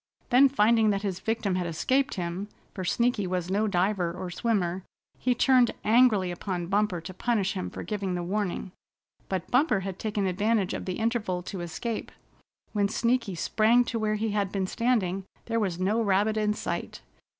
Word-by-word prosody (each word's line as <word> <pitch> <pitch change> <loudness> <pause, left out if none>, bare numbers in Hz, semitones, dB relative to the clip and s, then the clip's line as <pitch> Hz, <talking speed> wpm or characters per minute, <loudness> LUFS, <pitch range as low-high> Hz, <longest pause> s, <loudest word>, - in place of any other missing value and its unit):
Then 265 +3 +7
finding 225 -3 +4
that 200 0 0
his 190 -3 -2
victim 220 -1 -1
had 180 -1 -1
escaped 260 - 0
him, 180 +2 -3 0.3
for 185 - -5
Sneaky 235 +1 +1
was 180 0 -2
no 210 +3 +2
diver 185 -2 +1
or 180 +1 -6
swimmer, 190 -4 0 0.4
he 250 0 +1
turned 250 -1 +4
angrily 215 -5 +4
upon 175 0 -3
Bumper 195 -1 0
to 175 +3 -8
punish 200 -1 0
him 185 -2 -4
for - - -7
giving 195 -4 -2
the 175 - -2
warning. 190 0 -2 0.6
But 185 -2 -3
Bumper 250 -5 +3
had 190 -1 -5
taken 210 -2 -1
advantage 200 +2 +1
of - - -4
the 185 - -3
interval 220 -6 -1
to 185 0 -6
escape. 175 +7 -4 0.6
When 200 -2 +1
Sneaky 235 -3 0
sprang 225 +7 +3
to 230 - -2
where 215 -1 0
he 215 0 -1
had 200 -2 0
been 195 -2 -1
standing 195 -4 0 0.2
there 230 0 0
was 190 -6 -1
no 205 +5 +1
rabbit 205 +1 +2
in 210 -1 +1
sight. - - -4
205 Hz, 180 wpm, -27 LUFS, 185-225 Hz, 0.6 s, Then